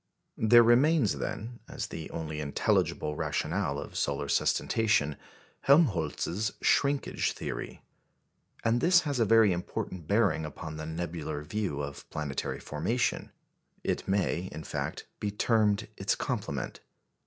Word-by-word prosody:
There 120 +2 +7
remains, 125 +1 +4
then, 120 +3 -5
as - - -4
the 80 - -7
only 80 -2 -4
intelligible 75 +1 0
rationale 75 0 -1
of - - -7
solar 70 0 -1
sustentation, 105 -2 +2 0.5
Helmholtz's 105 - +2
shrinkage 140 0 +1
theory. - - -6 0.8
And 115 +1 +3
this 180 +3 +6
has 145 -5 -2
a 115 - +4
very 110 -1 +6
important 85 -1 -5
bearing 100 -5 +2
upon 75 +1 -6
the 80 0 -5
nebular 80 -2 -4
view 75 -5 -2
of 70 0 -8
planetary 75 -3 -3
formation; 110 +12 -1 0.5
it - - -2
may, 95 -2 0
in 80 +1 -7
fact, - - -4
be 105 - -1
termed 105 0 +2
its 100 - 0
complement. - - -3
95 Hz, 125 wpm, -29 LUFS, 75-115 Hz, 0.8 s, There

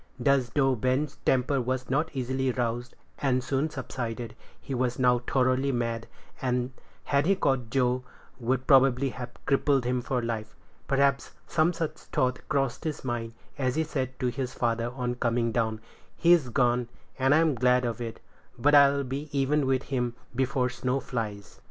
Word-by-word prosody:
Thus, 140 -3 +2
though 135 -2 +4
Ben's 130 +5 0
temper 130 +1 +2
was 130 +1 -2
not 150 +5 +1
easily 130 0 0
roused, 120 0 -2 0.2
and 130 -3 +1
soon 135 +5 0
subsided, 120 -5 -5 0.2
he 135 - -6
was 125 -1 0
now 125 -1 +4
thoroughly 130 +2 +1
mad, 115 -2 -2 0.3
and, 125 -1 0 0.3
had 140 +2 +1
he 195 - +4
caught 135 -9 0
Joe, 125 +1 +1 0.4
would 130 +2 0
probably 135 -1 +5
have 125 -1 -6 0.2
crippled 140 -2 +2
him 125 0 0
for 125 +1 -1
life. 110 -2 -4 0.3
Perhaps 140 0 +1
some 165 +1 +2
such 160 -2 -3
thought 130 0 -1
crossed 135 -4 0
his 155 -2 -3
mind, 115 -2 -3 0.3
as 130 -2 0
he 160 - +2
said 130 -4 -3
to 125 -2 +1
his 125 +1 -4
father 115 0 0
on 125 -1 -2
coming 120 -1 0
down, 110 -2 0 0.4
"He's 170 -6 +4
gone, 120 -1 +2 0.3
and 135 +2 +4
I'm 160 -1 +4
glad 125 0 +3
of 120 0 -3
it; 115 -1 -5 0.4
but 145 +5 +3
I'll 140 -1 +6
be 140 +4 -5
even 140 0 +1
with 130 0 +1
him 125 -3 -2 0.2
before 130 0 +1
snow 125 +2 -1
flies." 110 -6 -5
130 Hz, 165 wpm, -28 LUFS, 120-140 Hz, 0.4 s, I'll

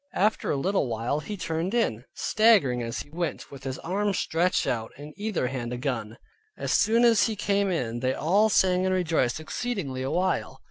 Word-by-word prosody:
After 210 +3 +1
a 145 - +1
little 185 0 0
while 115 +5 -1
he 205 +6 -6
turned 165 +4 -2
in, 125 - 0
staggering 200 - +3
as 115 -1 -3
he 145 - -13
went, 170 +1 -4
with 140 -1 -11
his 130 -1 -3
arms 200 +3 -1
stretched 175 +3 +1
out, 115 -4 -2
in 150 +2 -10
either 210 -9 -2
hand 125 -2 -4
a - - -3
gun. 120 -4 -3 0.4
As - - -3
soon 230 +3 +4
as 230 -2 +5
he 220 - -2
came 200 0 +1
in 120 -10 -2
they 130 +1 0
all 200 +7 +3
sang 185 -3 +3
and 185 - +1
rejoiced 160 -7 +1
exceedingly 155 - -3
a 130 - -2
while. 185 +4 -1
165 Hz, 195 wpm, -26 LUFS, 130-200 Hz, 0.4 s, as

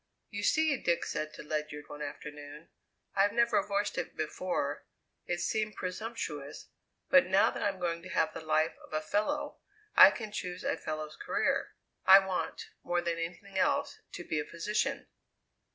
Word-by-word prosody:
"You 205 -1 -4
see," 310 +6 +3
Dick 170 -6 0
said 155 0 -3
to - - -8
Ledyard 150 -1 -4
one 150 - -9
afternoon, 145 +1 -8 0.4
"I've 200 +1 +3
never 235 +5 +3
voiced 205 -5 -1
it - - -5
before 150 -3 -2 0.4
it 175 0 -1
seemed 215 +1 -1
presumptuous 180 -7 -5 0.4
but 275 -5 +7
now 190 +2 +4
that - - -6
I'm 200 -2 0
going 170 -1 -1
to 185 - -10
have 160 - +1
the - - -6
life 155 +1 +2
of - - -14
a 155 - 0
fellow, 290 - -1 0.4
I - - +11
can 215 -3 -6
choose 180 -3 -5
a - - +1
fellow's 155 -1 -5
career. - - 0 0.3
I 190 - +10
want, 190 -2 -2
more 175 0 0
than 170 -1 -1
anything 190 +4 -4
else, 285 +3 +1
to - - -6
be 155 -2 -1
a - - -1
physician." 210 +7 -1
180 Hz, 170 wpm, -31 LUFS, 155-210 Hz, 0.4 s, I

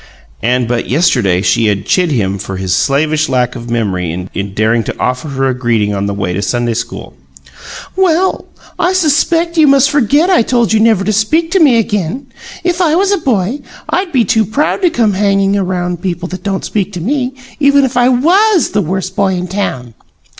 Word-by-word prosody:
And 125 +1 0
but 120 0 -2
yesterday 120 - +2
she 115 0 +2
had 100 -1 -1
chid 180 -2 +1
him 100 -8 -1
for 95 0 -6
his 95 -1 -1
slavish 150 +7 +1
lack 125 -1 0
of 120 -1 -8
memory 95 -8 -2 0.2
in 100 0 -4
daring 110 +2 +1
to - - -6
offer 125 +3 -2
her 135 -2 -1
a 130 - 0
greeting 115 -4 0
on 100 0 -2
the 100 - -2
way 95 -3 -2
to 100 - -2
Sunday 120 +2 -1
school. 115 +2 -6 0.8
"Well! 375 0 +1 0.3
I 350 - +2
expect 335 -1 +1
you 305 - +6
must 275 0 +4
forgot 290 - +2
I 360 - +4
told 235 -1 +1
you 220 - +3
never 220 -3 +3
to 215 - 0
speak 315 +11 +1
to 385 - +2
me 280 -8 +5
again! 225 - -2 0.3
If 355 +1 0
I 320 -3 +2
was 390 +3 +2
a 400 - +1
boy, 235 - -1 0.3
I'd 375 -2 -1
be 250 -5 +2
too 220 +3 +2
proud 285 - -1
to 360 - +3
come 230 -9 +1
hanging 195 0 +1
around 180 -3 -2
people 175 -1 -3
that 185 0 -7
don't 195 -1 -3
speak 205 -1 -2
to 180 - -5
me, 255 - -2 0.2
even 280 -1 +4
if 255 - -4
I 245 0 +3
WAS 350 - +3
the 210 - +1
Worst 185 +2 -3
Boy 195 -2 +1
in 180 0 -4
Town!" 130 - -4
195 Hz, 205 wpm, -13 LUFS, -, 0.8 s, you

